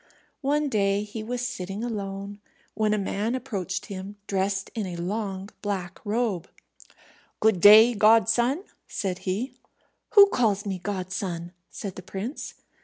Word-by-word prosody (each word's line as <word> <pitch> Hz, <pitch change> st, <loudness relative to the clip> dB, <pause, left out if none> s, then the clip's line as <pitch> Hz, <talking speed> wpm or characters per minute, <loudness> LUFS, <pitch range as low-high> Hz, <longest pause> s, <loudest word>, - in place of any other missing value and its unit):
One 295 Hz, +2 st, +1 dB
day 200 Hz, -4 st, +1 dB
he 210 Hz, +1 st, -6 dB
was 245 Hz, +3 st, -2 dB
sitting 195 Hz, -1 st, -5 dB
alone, 200 Hz, -3 st, -4 dB, 0.3 s
when 215 Hz, -1 st, +1 dB
a 215 Hz, -, +2 dB
man 210 Hz, +4 st, -1 dB
approached 190 Hz, -7 st, -3 dB
him, 195 Hz, 0 st, -7 dB
dressed 195 Hz, 0 st, -1 dB
in 215 Hz, -4 st, -3 dB
a 180 Hz, -, -5 dB
long 195 Hz, +2 st, -3 dB
black 190 Hz, -3 st, -4 dB
robe. 210 Hz, -5 st, -1 dB, 0.9 s
"Good 220 Hz, -4 st, +3 dB
day, 220 Hz, +4 st, +9 dB
godson," 230 Hz, -, +4 dB, 0.2 s
said 185 Hz, -3 st, -3 dB
he. 220 Hz, +9 st, -2 dB, 0.6 s
"Who 405 Hz, -1 st, +11 dB
calls 210 Hz, -, +1 dB
me 190 Hz, -2 st, -3 dB
godson?" 185 Hz, -2 st, -4 dB, 0.2 s
said 195 Hz, -3 st, -7 dB
the -, -, -6 dB
prince. 195 Hz, -, -6 dB
205 Hz, 135 wpm, -26 LUFS, 190-225 Hz, 0.9 s, Who